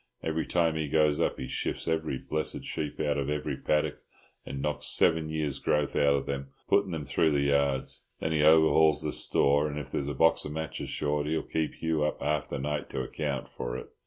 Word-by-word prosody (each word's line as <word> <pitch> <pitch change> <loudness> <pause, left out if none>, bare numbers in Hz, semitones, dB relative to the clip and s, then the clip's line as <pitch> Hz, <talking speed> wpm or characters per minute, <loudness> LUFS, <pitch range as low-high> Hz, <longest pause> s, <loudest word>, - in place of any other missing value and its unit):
Every 80 0 -1
time 85 -2 +1
he 80 -1 -1
goes 75 0 +2
up - - 0
he 65 - -4
shifts - - -3
every 80 -4 -1
blessed 75 +3 -3
sheep 75 -2 -4
out 75 -2 0
of 70 0 -2
every 75 0 -2
paddock, 75 0 0 0.5
and 70 - -5
knocks 75 +1 -1
seven 80 -1 +3
years' 75 -3 -2
growth 75 -2 0
out 70 -1 +4
of 70 - -2
them 70 -1 -4 0.2
putting 100 -1 +3
them 80 -4 -4
through 80 +1 +2
the 70 - +2
yards; 70 -1 0
then 80 - -2
he 80 -1 +2
overhauls 80 0 +5
the 75 - -1
store, 70 +2 +3
and 75 0 -5
if 75 -3 -6
there's 70 - -2
a 70 - -3
box 80 +4 +4
of 75 - -5
matches 80 0 -4
short 75 0 -1
he'll 80 +1 0
keep 80 -1 -2
Hugh 80 -2 0
up 75 - -1
half 75 0 -1
the 70 - -3
night 75 +2 -3
to 65 - -3
account 70 0 -3
for - - -4
it. - - -9
75 Hz, 220 wpm, -29 LUFS, 70-80 Hz, 0.5 s, overhauls